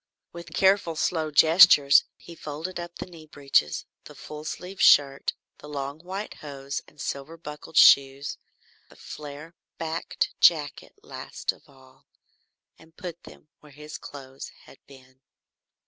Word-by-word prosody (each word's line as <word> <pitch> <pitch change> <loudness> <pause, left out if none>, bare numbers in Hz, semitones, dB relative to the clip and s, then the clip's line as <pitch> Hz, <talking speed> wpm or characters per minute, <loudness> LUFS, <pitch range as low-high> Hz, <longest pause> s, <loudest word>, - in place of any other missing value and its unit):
With 170 -1 -10
careful 190 -4 +2
slow 160 0 -1
gestures 150 -2 +6
he 170 - -13
folded 165 +4 -7
up 175 0 -8
the - - -6
knee 165 -4 -14
breeches, 135 - 0 0.2
the - - -13
full 150 0 -9
sleeved 185 +4 -7
shirt, 140 -1 +4 0.3
the 150 - -12
long 140 0 -5
white 190 +5 -6
hose 140 -1 -6
and 150 - -22
silver 140 +4 -5
buckled 150 0 -9
shoes, 140 +1 +5 0.5
the - - -18
flare 150 +2 -10 0.2
backed 165 0 -3
jacket 150 -4 +2
last - - -5
of - - -21
all, 130 -1 -22 0.7
and 160 +1 -21
put 175 -3 -8
them 150 - -16
where 150 -2 -18
his 150 +1 -10
clothes 135 -1 -10 0.2
had - - -17
been. 130 -1 -18
150 Hz, 140 wpm, -26 LUFS, 140-165 Hz, 0.7 s, gestures